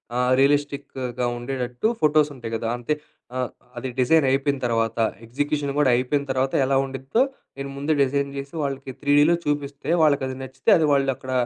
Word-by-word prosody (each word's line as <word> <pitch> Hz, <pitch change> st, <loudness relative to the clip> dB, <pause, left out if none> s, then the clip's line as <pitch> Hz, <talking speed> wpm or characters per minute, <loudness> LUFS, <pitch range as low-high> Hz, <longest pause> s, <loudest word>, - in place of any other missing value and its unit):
ఆ! -, -, 0 dB, 0.2 s
రియలిస్టిక్‌గా 140 Hz, -3 st, 0 dB
ఉండేటట్టు, 125 Hz, -, -2 dB
ఫోటోస్ 150 Hz, -1 st, +4 dB
ఉంటాయి 120 Hz, -3 st, -7 dB
కదా 115 Hz, 0 st, -3 dB
అంతే 120 Hz, +5 st, -1 dB, 0.4 s
ఆహ్, 125 Hz, -1 st, -1 dB, 0.3 s
అది 125 Hz, +2 st, -4 dB
డిజైన్ 145 Hz, +4 st, +4 dB
అయిపోయిన 140 Hz, 0 st, +1 dB
తర్వాత. 115 Hz, -1 st, 0 dB, 0.3 s
ఎగ్జిక్యూషన్ 145 Hz, +4 st, -1 dB
కూడా 145 Hz, -3 st, +4 dB
అయిపోయిన 135 Hz, +3 st, 0 dB
తర్వాత 130 Hz, +1 st, 0 dB
ఎలా 135 Hz, -, +1 dB
ఉండిద్దో, 135 Hz, -, -1 dB, 0.4 s
నేను 140 Hz, 0 st, -5 dB
ముందే 145 Hz, +3 st, 0 dB
డిజైన్ 140 Hz, +1 st, 0 dB
చేసి 140 Hz, +2 st, -6 dB
వాళ్ళకి 135 Hz, -1 st, -4 dB
త్రీ‌డ్‌లో 145 Hz, +3 st, +4 dB
చూపిస్తే 145 Hz, -1 st, -3 dB
వాళ్ళకి 145 Hz, -3 st, +3 dB
అది 130 Hz, -, -5 dB
నచ్చితే 130 Hz, 0 st, -3 dB
అది 160 Hz, -, +2 dB
వాళ్ళు 140 Hz, -1 st, +3 dB
అక్కడ 130 Hz, -, -8 dB
135 Hz, 160 wpm, -23 LUFS, 130-145 Hz, 0.4 s, ఫోటోస్